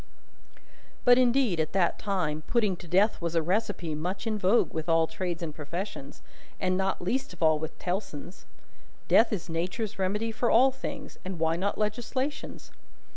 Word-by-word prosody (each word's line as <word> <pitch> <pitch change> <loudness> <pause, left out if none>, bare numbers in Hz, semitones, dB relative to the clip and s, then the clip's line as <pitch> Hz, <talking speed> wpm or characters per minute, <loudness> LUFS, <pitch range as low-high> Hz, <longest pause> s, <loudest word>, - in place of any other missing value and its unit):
But 245 0 +7
indeed, 245 -7 +3
at 155 - -1
that 185 -3 +2
time, 180 -7 -1
putting 215 -6 +2
to 175 - -11
death 195 +5 +3
was 170 0 -2
a 165 - +4
recipe 180 -2 -1
much 180 +8 -3
in 220 -1 0
vogue 200 +5 +3
with 160 +1 -3
all 165 0 +4
trades 175 0 -4
and 155 -3 -4
professions, 150 -1 -6 0.4
and 185 -1 +1
not 190 -1 -1
least 235 +2 -1
of 175 - -5
all 155 -1 +4
with 160 0 -6
Tellson's. 180 -2 -5 0.6
Death 225 - +5
is 200 -6 -3
Nature's 185 +6 -3
remedy 210 +4 0
for 235 +2 0
all 260 +4 +6
things, 275 +1 -7
and 185 -1 -5
why 160 0 +1
not 195 +4 -1
Legislation's? 245 +7 -3
190 Hz, 170 wpm, -28 LUFS, 165-220 Hz, 0.6 s, But